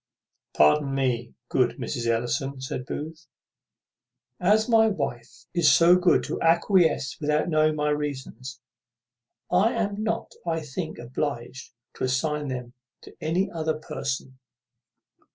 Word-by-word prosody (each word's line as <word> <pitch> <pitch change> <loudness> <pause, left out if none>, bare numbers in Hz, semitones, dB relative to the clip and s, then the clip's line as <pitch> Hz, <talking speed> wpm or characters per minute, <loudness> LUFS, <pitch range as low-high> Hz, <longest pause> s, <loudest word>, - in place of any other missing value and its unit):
"Pardon 135 - +4
me, 125 -3 -1
good 120 -2 +1
Mrs. 120 -1 -3
Ellison," 120 +4 -1
said 130 0 -5
Booth: 160 +2 -6 1.1
"as 210 +4 +3
my 225 -2 +5
wife 130 - -4
is 170 -5 +5
so 170 +6 +6
good 180 -1 +3
to - - -4
acquiesce 170 -4 +3
without 150 +3 +1
knowing 155 -1 +3
my 150 0 0
reasons, 135 -3 -4 0.9
I 195 +6 +3
am 210 -2 -2
not, 225 +1 -2
I 165 -1 -1
think, 155 +3 -5
obliged 125 +1 -5 0.2
to - - -4
assign 150 +3 -1
them 125 -2 -5 0.3
to - - -14
any 170 +5 0
other 160 -2 -2
person." 130 -3 -5
150 Hz, 125 wpm, -26 LUFS, 130-170 Hz, 1.1 s, so